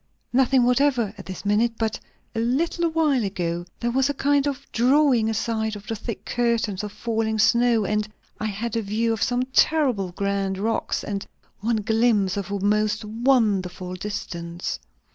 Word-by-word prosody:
"Nothing 260 0 +4
whatever, 245 -4 +2
at 195 - -10
this 190 +2 -7
minute; 220 +3 +2
but 220 -1 -1 0.3
a 225 - -2
little 325 +8 +1
while 305 -6 +2
ago 175 -3 -2
there 240 0 -1
was 265 +2 +2
a 285 - -1
kind 285 +1 +2
of 280 -2 -3
drawing 250 -2 +3
aside 220 -1 -1
of 205 0 -10
the 225 - -3
thick 225 +1 -6
curtain 235 -4 0
of 210 -1 -5
falling 220 0 -1
snow, 235 0 +3
and 210 +1 0 0.3
I 215 - -2
had 215 +3 -3
a 230 - +1
view 220 +3 0
of 220 - -4
some 245 0 +1
terribly 255 - +3
grand 200 0 -1
rocks, 225 +3 -1
and 200 -1 -4 0.3
one 220 0 0
glimpse 220 -3 +2
of 200 -1 -4
a 200 0 -2
most 210 +1 +1
wonderful 210 -6 +1
distance." 175 -3 -5
220 Hz, 165 wpm, -24 LUFS, 200-245 Hz, 0.3 s, Nothing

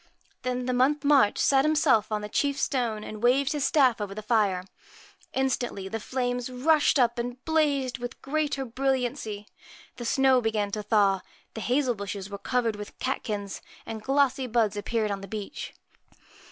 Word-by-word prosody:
Then 250 0 -2
the 255 - 0
Month 275 +4 +2
March 280 -7 +4
sat 270 -1 +4
himself 285 -8 +3
on 210 -1 -1
the 210 - -5
chief 280 +6 0
stone, 230 -5 -1
and 215 0 -8
waved 260 +3 +3
his 295 -2 0
staff 260 -8 +3
over 200 -1 -4
the 215 - -6
fire. 205 -5 +2 0.7
Instantly 245 -7 -1
the 225 +3 -4
flames 245 +1 -2
rushed 290 +5 +3
up 240 -2 +2
and 245 +1 -5
blazed 285 -5 +1
with 245 +1 -6
greater 285 -1 -1
brilliancy, 245 -4 -2 0.5
the 240 - -6
snow 265 +1 +4
began 215 -3 -1
to 210 - -2
thaw, 200 -2 +2 0.3
the 220 - -6
hazel 250 +2 +1
bushes 200 -1 -6
were 200 - -6
covered 235 -3 0
with 210 0 -9
catkins, 210 -6 -3 0.2
and 220 -1 -6
glossy 270 0 +1
buds 225 -3 +1
appeared 215 +1 -1
on 195 -1 -3
the 195 - -8
beech. 210 -2 -6
245 Hz, 165 wpm, -27 LUFS, 210-270 Hz, 0.7 s, March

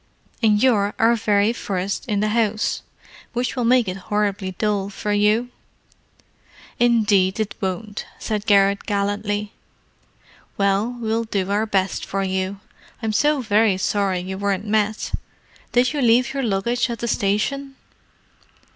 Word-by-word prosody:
And 215 -2 +4
you're 210 -6 +3
our 230 +1 +4
very 210 0 +2
first 195 +2 -3
in 205 -3 0
the 215 - +1
house, 215 -1 0 0.5
which 245 +2 -1
will 250 - -1
make 245 -2 +4
it 185 +1 -3
horribly 200 -3 -1
dull 205 -2 0
for 205 +1 -4
you." 210 +4 +2 1.3
"Indeed, 210 -5 +3
it 215 -2 -1
won't," 200 +2 -4
said 215 -1 -3
Garrett 200 -1 +3
gallantly. 205 0 -1 1.1
"Well, 200 +5 +1
we'll 225 0 -1
do 200 -3 -2
our 210 +2 +1
best 195 -2 0
for 195 0 -2
you. 190 +1 -2 0.4
I'm 220 -1 0
so 295 +4 +2
very 215 -3 +3
sorry 190 -1 0
you 190 +1 -5
weren't 200 0 -1
met. 215 0 0 0.6
Did 250 +3 +3
you 290 - -1
leave 245 +2 +3
your 275 - -1
luggage 235 +2 0
at 235 - -3
the 235 - -4
station?" 255 +7 -1
210 Hz, 140 wpm, -22 LUFS, 200-230 Hz, 1.3 s, And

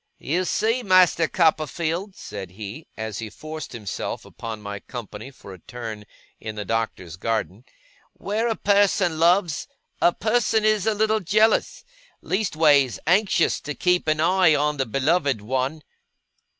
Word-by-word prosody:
'You 175 +6 -1
see, 225 +7 +1
Master 185 -5 +4
Copperfield,' 165 +4 0
said 100 -3 -8
he, 110 - -8
as 110 -2 -4
he 110 -1 -5
forced 155 +7 -8
himself 110 -5 -5
upon 110 -2 -7
my 100 -1 -6
company 110 +1 -8
for 100 -7 -12
a 95 - -13
turn 110 -1 -8 0.3
in 110 -1 -6
the 105 -1 -5
Doctor's 95 -6 -3
garden, 110 +1 -3 0.5
'where 215 +4 -2
a 225 - 0
person 200 -5 +2
loves, 170 -1 +2 0.3
a 175 - +5
person 220 +1 +1
is 215 -1 +2
a 220 - +2
little 220 +1 +2
jealous 215 - +2 0.3
leastways, 155 - +2
anxious 185 +1 +2
to 150 0 -5
keep 180 -2 +1
an 155 0 +1
eye 180 -1 +4
on 150 +1 0
the 135 -2 -1
beloved 140 +1 +1
one. 130 +7 -2
155 Hz, 145 wpm, -23 LUFS, 115-190 Hz, 0.5 s, a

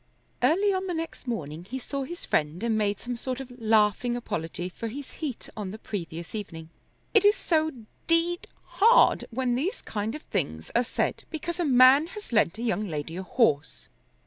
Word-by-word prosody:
Early 395 +5 +3
on 380 0 -1
the 355 - -2
next 325 -4 -5
morning 165 -8 -4
he 240 +8 -5
saw 275 +2 -4
his 345 +5 -8
friend 155 +6 0
and 230 -1 +1
made 205 -1 +1
some 245 0 -4
sort 255 +2 -4
of 265 -2 -8
laughing 220 +2 +3
apology 175 -6 -4
for 205 +5 -6
his 265 +4 -7
heat 280 -7 -4
on 210 -4 -4
the 210 - -7
previous 170 -6 -6
evening. 165 -7 -6 0.4
"It 435 - +6
is 410 +1 +6
so 315 -2 +1 0.4
d 335 +1 +3 0.2
hard 460 +4 +5
when 250 +1 0
these 335 - -2
kind 215 +3 -3
of 305 - -8
things 80 +1 -2
are 240 - +4
said 245 - -2
because 340 +2 -4
a 350 - +1
man 265 +3 +7
has 415 -12 -9
lent 215 -4 +3
a 230 - -5
young 215 -3 0
lady 155 0 -4
a 185 - -3
horse. 190 - +1
240 Hz, 190 wpm, -27 LUFS, 195-315 Hz, 0.4 s, man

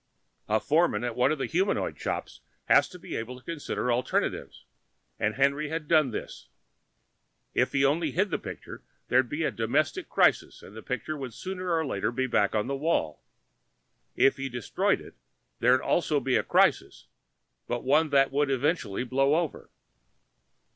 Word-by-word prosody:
A 110 +1 +3
foreman 160 +3 +1
at 120 -2 -3
one 125 +3 +3
of 155 - 0
the 135 - -2
humandroid 185 +4 0
shops - - -5 0.2
has - - +4
to 180 - -11
be - - -8
able 120 +3 -5
to 125 - -18
consider 150 -6 -3
alternatives 125 +1 -2 0.5
and 110 0 0
Henry 140 +2 +1
had 160 -1 -4
done 155 -4 +4
this. 110 - -7 1.1
If - - +1
he 140 0 +3
only 160 +4 +1
hid 195 +2 0
the - - -1
picture - - -9 0.3
there'd 125 -1 +3
be 160 +3 -2
a - - 0
domestic 120 +7 -1
crisis - - +2
and 100 - -13
the 110 - -8
picture 130 +6 -4
would 130 -6 -7
sooner 185 -1 -5
or 160 -1 +1
later 115 -4 -1
be 130 +2 -1
back 110 -4 +1
on 105 - +1
the 140 - -2
wall; 135 - -1 0.9
if 135 - +4
he 135 0 -4
destroyed 120 -3 0
it - - -13 0.5
there'd 125 +2 +4
also 155 -4 +1
be 135 -2 0
a - - +3
crisis, - - +1 0.6
but 120 -1 -3
one 150 +4 +3
that 135 -1 +3
would 145 +1 +1
eventually 135 - 0
blow 135 +3 +2
over. 165 -2 -3
135 Hz, 170 wpm, -27 LUFS, 125-155 Hz, 1.1 s, has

